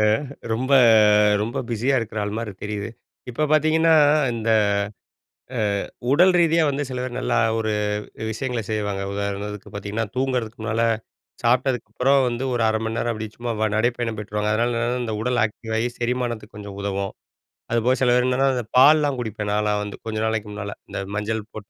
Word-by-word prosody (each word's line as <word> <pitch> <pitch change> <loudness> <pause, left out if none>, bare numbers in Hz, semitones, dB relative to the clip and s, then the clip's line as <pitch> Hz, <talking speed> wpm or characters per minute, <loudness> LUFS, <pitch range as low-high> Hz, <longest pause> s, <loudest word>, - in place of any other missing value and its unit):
அ - - +3 0.5
ரொம்ப 130 +5 -1 0.7
ரொம்ப 110 +3 -3
பிஸியா 120 +4 +1
இருக்குற 110 -1 -4
ஆள் 105 +1 -3
மாரி 115 -3 -4
தெரியுது. 105 +1 -4 0.4
இப்ப 150 +6 0
பாத்தீங்கன்னா, 160 +1 +4 0.4
இந்த 115 0 -2 1.1
அ - - 0 0.5
உடல் 180 +6 +5
ரீதியா 165 0 +4
வந்து 140 +1 -1
சிலதூ 125 0 -3
நல்லா - - 0 0.2
ஒரு 110 -1 -1 0.6
விஷயங்கள 125 +1 -3
செய்வாங்க. 105 -2 -2
உதாரணத்துக்கு 100 +1 -4
பாத்தீங்கன்னா 105 +3 -3
தூங்குறதுக்கு 125 -4 -1
முன்னால 110 +1 0 0.6
சாப்புட்டதுக்கப்றோ 125 +2 +1
வந்து 120 +2 -2
ஒரு 120 - 0
1/2 110 - +1
மணி 110 0 -2
நேரம் 120 - 0
அப்டி 110 0 -5
சும்மா 115 -2 -1
நடைப்பயணம் 115 0 0
போய்ட்டு 105 -1 -8
வருவாங்க. 105 0 +1
அதனால 120 +3 +1
என்னன்னா 120 +1 -1
இந்த 110 -2 -3
உடல் 125 +1 0
ஆக்டிவ் 110 +1 -4
ஆகி 120 +2 +1
செரிமானத்துக்கு 120 -3 -2
கொஞ்சம் 100 -1 -8
உதவும். 100 -1 -2 0.6
அதுபோக, 120 +2 +2
சில 125 - +4
பேர் 125 0 +3
என்னென்னா 130 +2 +2
அந்த 120 -3 -3
பால்லலாம் 145 0 +6
குடிப்பேன் 105 -2 -4
நாலாம் 105 0 +1
வந்து 105 -1 -7
கொஞ்ச 110 -1 -3
நாளைக்கு 110 -1 -1
முன்னால, 100 0 -5 0.2
இந்த - - -4 0.2
மஞ்சள் 110 +1 -2
போட்டு, 105 -2 -9
115 Hz, 165 wpm, -23 LUFS, 105-125 Hz, 1.1 s, பால்லலாம்